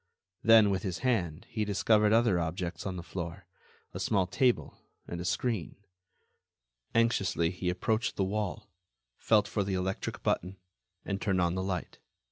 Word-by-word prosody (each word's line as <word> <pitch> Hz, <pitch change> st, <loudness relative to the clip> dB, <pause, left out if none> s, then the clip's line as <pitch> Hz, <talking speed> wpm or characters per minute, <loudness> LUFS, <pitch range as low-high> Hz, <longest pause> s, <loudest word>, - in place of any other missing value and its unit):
Then, 110 Hz, -2 st, +7 dB
with 95 Hz, -, 0 dB
his 95 Hz, -3 st, -3 dB
hand, 90 Hz, -10 st, 0 dB
he 110 Hz, -, -2 dB
discovered 105 Hz, +1 st, +3 dB
other 115 Hz, -5 st, +4 dB
objects 85 Hz, +2 st, -3 dB
on 95 Hz, -, -3 dB
the 85 Hz, -, -6 dB
floor—a 85 Hz, +1 st, -9 dB
small 95 Hz, -3 st, +2 dB
table 125 Hz, +7 st, +1 dB, 0.3 s
and 85 Hz, 0 st, -5 dB
a -, -, -5 dB
screen. 110 Hz, -2 st, -1 dB, 1.2 s
Anxiously, 100 Hz, -7 st, +2 dB
he 90 Hz, 0 st, -3 dB
approached 110 Hz, +6 st, 0 dB
the 95 Hz, -, +1 dB
wall, 100 Hz, 0 st, -3 dB, 0.5 s
felt 110 Hz, -2 st, +3 dB
for 105 Hz, -, -1 dB
the 95 Hz, -1 st, -2 dB
electric 95 Hz, +1 st, -3 dB
button, 90 Hz, +2 st, -1 dB, 0.5 s
and 100 Hz, 0 st, -3 dB
turned 95 Hz, -3 st, +1 dB
on 85 Hz, -1 st, +2 dB
the 95 Hz, -, -2 dB
light. 95 Hz, -2 st, -4 dB
95 Hz, 150 wpm, -30 LUFS, 90-105 Hz, 1.2 s, Then